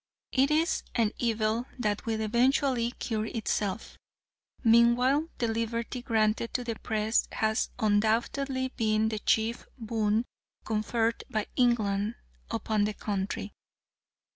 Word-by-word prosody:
It 270 +1 +3
is 320 +3 +2
an 225 -3 +2
evil 225 +1 0
that 215 -2 -2
will 220 -1 0
eventually 245 +2 +2
cure 220 -2 -2
itself. 210 -2 -3 0.6
Meanwhile 240 +6 +4
the 235 - 0
liberty 230 +2 -2
granted 225 -1 0
to 250 - 0
the 235 -1 -2
Press 220 +1 0
has 220 0 0
undoubtedly 235 +5 +1
been 220 -3 +1
the 215 -1 -3
chief 225 +2 0
boon 220 -1 0 0.4
conferred 225 +1 0
by 215 -4 -1
England 215 -3 +2 0.3
upon 215 -2 0
the 210 0 -3
country. 200 0 -3
225 Hz, 115 wpm, -29 LUFS, 215-240 Hz, 0.6 s, Meanwhile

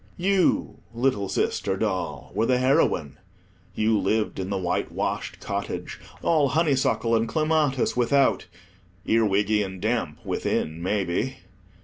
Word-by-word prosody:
You, 190 0 +1 0.2
little 115 -6 0
sister 95 - -1
doll, 95 -3 -3
were 110 +4 +1
the 125 - +3
heroine. 130 - +1 0.6
You 110 0 +2
lived 105 +2 0
in 95 0 -3
the 100 - -1
white 90 -1 -1
washed - - -3
cottage, - - -4 0.2
all 155 -4 +3
honeysuckle 135 -6 +2
and 115 0 +1
clematis 155 -4 +1
without—earwiggy 100 -3 0
and 95 -1 -6
damp 110 -8 -1
within, 80 +2 -2
maybe. 100 +7 -1
110 Hz, 115 wpm, -25 LUFS, 95-135 Hz, 0.6 s, the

